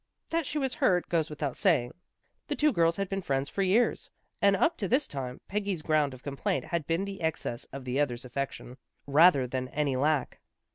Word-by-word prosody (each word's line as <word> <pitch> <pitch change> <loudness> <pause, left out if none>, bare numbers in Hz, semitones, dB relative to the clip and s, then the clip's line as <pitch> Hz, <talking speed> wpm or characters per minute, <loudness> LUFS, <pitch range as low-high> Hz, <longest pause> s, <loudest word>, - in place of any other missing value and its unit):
That 330 -3 0
she - - -3
was 265 -3 0
hurt, 180 -2 +2
goes 165 -2 +1
without 145 -3 -3
saying. 150 - +2 0.6
The - - -1
two 300 0 +3
girls 165 -3 +3
had 195 0 -2
been 195 +1 -3
friends 135 -4 -1
for 200 - -2
years, 200 +6 +2 0.3
and, 200 -1 +5
up 320 - +2
to 200 - -2
this 260 +8 +2
tune, 130 -3 -5
Peggy's 200 -5 -2
ground 150 -4 +1
of 125 - -16
complaint 140 -2 -2
had 170 -4 -3
been 165 +4 0
the 200 0 -7
excess 155 -7 -2
of 135 -1 -9
the 130 +2 -1
other's 125 -4 -1
affection, 125 -1 -5 0.3
rather 145 -1 +5
than 130 +1 -3
any 140 0 -1
lack. 145 0 0
155 Hz, 200 wpm, -29 LUFS, 135-195 Hz, 0.6 s, and